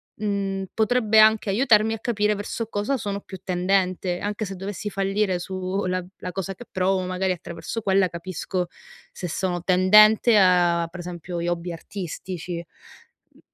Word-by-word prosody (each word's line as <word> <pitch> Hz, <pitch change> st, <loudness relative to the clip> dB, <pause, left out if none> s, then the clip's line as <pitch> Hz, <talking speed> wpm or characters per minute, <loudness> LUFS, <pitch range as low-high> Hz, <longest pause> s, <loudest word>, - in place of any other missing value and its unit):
mhmm, 200 Hz, -2 st, -2 dB
potrebbe 220 Hz, -1 st, +3 dB
anche 215 Hz, -1 st, +5 dB
aiutarmi 220 Hz, 0 st, +4 dB
a 225 Hz, -, -5 dB
capire 210 Hz, -3 st, +1 dB
verso 215 Hz, +2 st, -4 dB
cosa 215 Hz, +6 st, -1 dB
sono 200 Hz, -2 st, -3 dB
più 190 Hz, -1 st, -10 dB
tendente. 180 Hz, -1 st, 0 dB
Anche 210 Hz, +1 st, -3 dB
se 195 Hz, 0 st, -6 dB
dovessi 200 Hz, +2 st, -5 dB
fallire 195 Hz, -1 st, 0 dB
su 185 Hz, +2 st, -3 dB
la 185 Hz, 0 st, -1 dB, 0.2 s
la 180 Hz, -, -5 dB
cosa 195 Hz, 0 st, -4 dB
che 245 Hz, -, -11 dB
provo, 185 Hz, 0 st, +1 dB
magari 185 Hz, 0 st, -1 dB
attraverso 175 Hz, +6 st, -6 dB
quella 195 Hz, -2 st, +3 dB
capisco 180 Hz, +1 st, -4 dB, 0.4 s
se 180 Hz, -, -6 dB
sono 175 Hz, +1 st, -2 dB
tendente 210 Hz, +5 st, +6 dB
a, 175 Hz, -3 st, +4 dB
per 175 Hz, +1 st, -8 dB
esempio, 175 Hz, 0 st, -6 dB
gli 170 Hz, -, -2 dB
hobby 175 Hz, 0 st, -2 dB
artistici. 175 Hz, -1 st, -6 dB, 0.7 s
Mh. -, -, -23 dB
190 Hz, 155 wpm, -24 LUFS, 180-210 Hz, 0.7 s, tendente